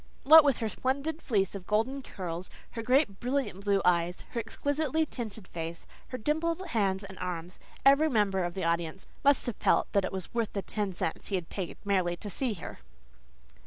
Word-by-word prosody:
What 315 +3 +10
with 280 -3 +3
her 225 - -1
splendid 280 +7 -2
fleece 195 -6 +1
of 195 -2 -8
golden 230 +6 +1
curls, 180 -6 -6 0.2
her 230 - -4
great, 250 -4 +2
brilliant 250 -6 -2
blue 200 -2 +2
eyes, 175 0 +2
her 235 - -2
exquisitely 285 +6 0
tinted 220 -8 -6
face, 165 0 -6 0.2
her 255 - -5
dimpled 330 - -1
hands 195 -6 +1
and 190 -1 -10
arms, 180 0 -5 0.3
every 280 +3 +6
member 200 -6 +2
of 175 0 -3
the 190 - -3
audience 170 +1 -1 0.2
must 285 -1 +5
have 240 -4 -3
felt - - +2
it 195 -2 +2
was 190 -2 -5
worth 230 -2 -1
the 200 - -2
ten 205 -2 -2
cents 170 -2 -3
he 200 - 0
had 175 -3 -3
paid 185 -4 -5
merely 185 -3 +1
to 205 +1 -6
see 245 +1 -1
her. 170 - -8
205 Hz, 190 wpm, -30 LUFS, 185-265 Hz, 0.3 s, What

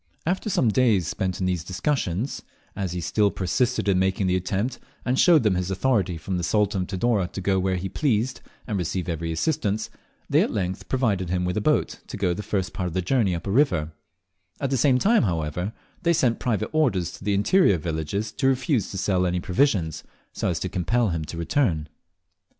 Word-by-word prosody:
After 185 +6 -1
some 130 - +2
days 105 -6 +3
spent 95 -1 -2
in 95 - 0
these 90 -3 -1
discussions, 100 - -2 0.3
as 95 -3 -3
he 90 - -3
still 105 +5 +2
persisted 100 +5 0
in 95 -2 +3
making 95 +1 +1
the 90 0 +2
attempt, 95 +7 -2 0.3
and 130 +1 +1
showed 165 -7 +6
them 105 -3 +3
his 90 0 -1
authority 95 -3 +1
from 90 +3 -3
the 90 - -2
Sultan 105 +1 +1
of 90 - -3
Tidore 100 -1 +1
to 95 - -7
go 95 0 +1
where 95 0 0
he 90 +1 -3
pleased 120 +2 0 0.2
and 105 -5 -2
receive 90 0 -2
every 85 -1 -2
assistance, 105 - -1 0.4
they - - +4
at - - +1
length 95 -2 -3
provided 105 -9 0
him 90 0 0
with 90 0 -1
a 105 - 0
boat - - +1
to - - -6
go 90 - +1
the 100 - -4
first 95 -3 -2
part 90 - -2
of 85 - -6
the 95 - 0
journey 100 -2 +2
up 85 - -6
a 100 - -2
river; 90 - +2 0.7
at 140 -1 -2
the - - +2
same 130 +1 +4
time, 225 - +4
however, 85 0 -1 0.3
they 170 -1 +3
sent 125 -7 +2
private 110 -6 -1
orders 115 - +1
to - - -12
the 100 0 +1
interior 100 - +4
villages 80 +6 -3
to 135 +3 0
refuse 130 - +1
to 95 - -6
sell 90 -1 +1
any 90 0 0
provisions, 90 - +1 0.3
so - - -1
as - - -1
to - - -2
compel 115 +6 +1
him 80 -2 -2
to 80 +3 -7
return. 85 - 0
95 Hz, 210 wpm, -25 LUFS, 90-120 Hz, 0.7 s, showed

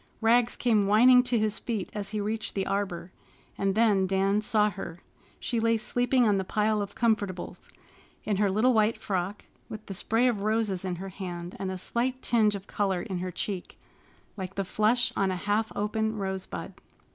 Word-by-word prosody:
Rags 235 +1 +3
came 215 -5 +2
whining 250 +5 +7
to 245 -1 +1
his 215 -1 0
feet 220 -6 -4
as 205 -2 -4
he 215 - -3
reached 215 +2 -3
the 195 -1 0
arbor. 190 -3 -3 0.4
And 195 -1 0
then 210 -4 +3
Dan 195 +2 +2
saw 210 -1 +2
her. 175 -3 -8 0.4
She 235 - -2
lay 230 0 +2
sleeping 245 +2 +2
on 205 -2 +3
the 190 - 0
pile 210 +2 +1
of 200 0 -6
comfortables, 205 -6 -1 0.5
in 205 -2 -1
her 205 0 +2
little 220 +6 +3
white 220 0 +3
frock, 190 +1 -3 0.2
with 215 0 -8
the 195 - -6
spray 225 +6 +1
of 225 -5 0
roses 215 -3 0
in 185 -2 -2
her 190 +3 -6
hand 180 -2 -6
and 190 - -2
a 185 - -4
slight 250 +7 -1
tinge 215 -3 +3
of 195 -1 -7
color 195 -4 -1
in 190 -5 -4
her 185 +1 -3
cheek, 185 +1 -5 0.6
like 190 -1 -6
the 195 - -1
flush 215 +5 +2
on 195 -1 +1
a 185 - -1
half 205 +4 -1
open 220 +1 -1
rosebud. 190 -2 -4
210 Hz, 190 wpm, -28 LUFS, 190-225 Hz, 0.6 s, whining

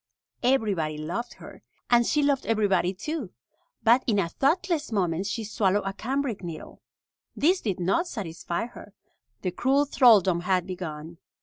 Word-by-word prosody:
Everybody 205 - +1
loved 170 +11 -4
her, - - -13 0.3
and 240 -1 +4
she 295 -1 +2
loved 280 -2 +1
everybody 200 -5 +2
too. 230 - -5 0.5
But 235 +3 +5
in 215 -4 +2
a 180 -4 +1
thoughtless 310 - 0
moment 185 -2 0
she 225 +2 -3
swallowed 205 -1 +1
a 195 - -2
cambric 250 -2 -3
needle. 165 -3 -8 0.5
This 360 +5 +2
did 195 -5 -2
not 195 - +1
satisfy 170 - -4
her. 210 -4 -13 0.5
The 180 - -1
cruel 270 +9 +2
thraldom 210 -11 +5
had 180 0 0
begun. 170 -3 -7
205 Hz, 145 wpm, -26 LUFS, 180-260 Hz, 0.5 s, But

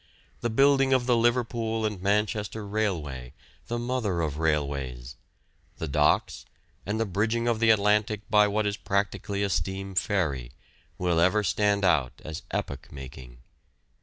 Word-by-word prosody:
The 120 - -1
building 135 +2 +4
of 130 -2 +2
the 125 -1 +3
Liverpool 115 -1 +1
and 105 -4 -3
Manchester 105 +1 0
Railway, 80 - -2 0.3
the 120 - -2
mother 120 -7 -1
of 75 -2 -2
railways, 70 -5 -2 0.6
the 80 - -4
docks, 75 +1 +1 0.4
and 105 +2 -1
the 115 - +1
bridging 110 +4 0
of 115 -2 +1
the 115 0 +3
Atlantic 105 0 +3
by 105 -1 +5
what 105 +1 0
is 105 0 -1
practically 100 0 -1
a 100 - 0
steam 95 +2 -2
ferry, 75 - -1 0.4
will 90 -2 +1
ever 95 +5 +3
stand 100 +1 +1
out 70 -9 +2
as 80 0 -6
epoch 70 - -4
making. 65 -3 -11
100 Hz, 145 wpm, -27 LUFS, 75-110 Hz, 0.6 s, by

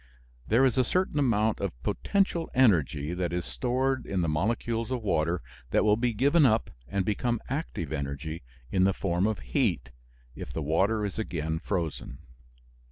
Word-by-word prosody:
There 120 +5 +4
is 130 -1 +2
a - - +5
certain 180 +2 0
amount 110 -5 +2
of 90 -11 -4
potential 190 - 0
energy 85 - +3
that 90 -1 -2
is 90 0 -2
stored 125 - -1
in 95 -2 -1
the 85 - 0
molecules 115 +8 -1
of 125 -3 -2
water 85 -2 0 0.3
that - - +3
will 105 -1 +4
be 120 +2 +1
given 140 +9 +3
up 115 -4 +3 0.2
and 100 -2 -1
become 120 +3 0
active 130 - -3
energy 70 +3 -4 0.3
in 95 -1 +3
the 95 +1 +4
form 90 +1 0
of 110 -2 -1
heat, - - -1 0.4
if - - -7
the 80 - -3
water 100 +8 +1
is 100 +2 -4
again 80 -6 -2
frozen. 85 -8 -3
100 Hz, 165 wpm, -28 LUFS, 80-120 Hz, 0.4 s, a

